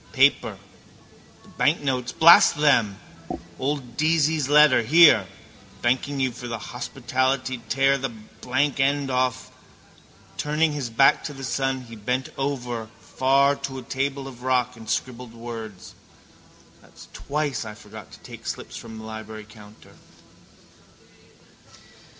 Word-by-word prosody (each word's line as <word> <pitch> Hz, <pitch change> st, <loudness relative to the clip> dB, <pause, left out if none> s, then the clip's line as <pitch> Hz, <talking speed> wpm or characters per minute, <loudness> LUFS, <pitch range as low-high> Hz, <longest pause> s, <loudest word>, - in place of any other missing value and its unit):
Paper. -, -, +3 dB, 0.9 s
The -, -, -19 dB
banknotes, 135 Hz, -5 st, 0 dB
blast 170 Hz, +1 st, +7 dB
them. 120 Hz, -10 st, +2 dB, 0.6 s
Old 135 Hz, -3 st, -3 dB
Deasy's 155 Hz, -2 st, +1 dB
letter. 150 Hz, -4 st, +6 dB
Here. 160 Hz, +7 st, +6 dB, 0.6 s
Thanking 130 Hz, +3 st, 0 dB
you 130 Hz, -1 st, +1 dB
for 120 Hz, +1 st, -9 dB
the 115 Hz, -1 st, -4 dB
hospitality 130 Hz, +2 st, -2 dB
tear 135 Hz, +2 st, +2 dB
the 135 Hz, +1 st, -2 dB
blank 125 Hz, +5 st, -3 dB
end 140 Hz, 0 st, +1 dB
off. 125 Hz, -1 st, -1 dB, 0.9 s
Turning 150 Hz, +6 st, +1 dB
his 140 Hz, -5 st, -4 dB
back 125 Hz, +4 st, +4 dB
to 145 Hz, -, -5 dB
the 135 Hz, -1 st, -10 dB
sun 135 Hz, 0 st, -1 dB
he 115 Hz, -2 st, -11 dB
bent 125 Hz, +5 st, -2 dB
over 125 Hz, -5 st, -3 dB
far 140 Hz, +3 st, +2 dB
to 135 Hz, -1 st, -6 dB
a 130 Hz, -, -7 dB
table 135 Hz, +2 st, -3 dB
of 125 Hz, -2 st, -11 dB
rock 125 Hz, -1 st, 0 dB
and 110 Hz, -1 st, -11 dB
scribbled 125 Hz, -2 st, -4 dB
words. 115 Hz, -4 st, -8 dB, 0.9 s
That's -, -, -16 dB
twice 145 Hz, -4 st, -3 dB
I 105 Hz, -1 st, -8 dB
forgot 105 Hz, -1 st, -12 dB
to -, -, -13 dB
take -, -, -11 dB
slips -, -, -6 dB
from 110 Hz, -1 st, -9 dB
the 110 Hz, -, -9 dB
library 110 Hz, -1 st, -8 dB
counter. 105 Hz, -1 st, -16 dB
130 Hz, 130 wpm, -24 LUFS, 115-140 Hz, 0.9 s, blast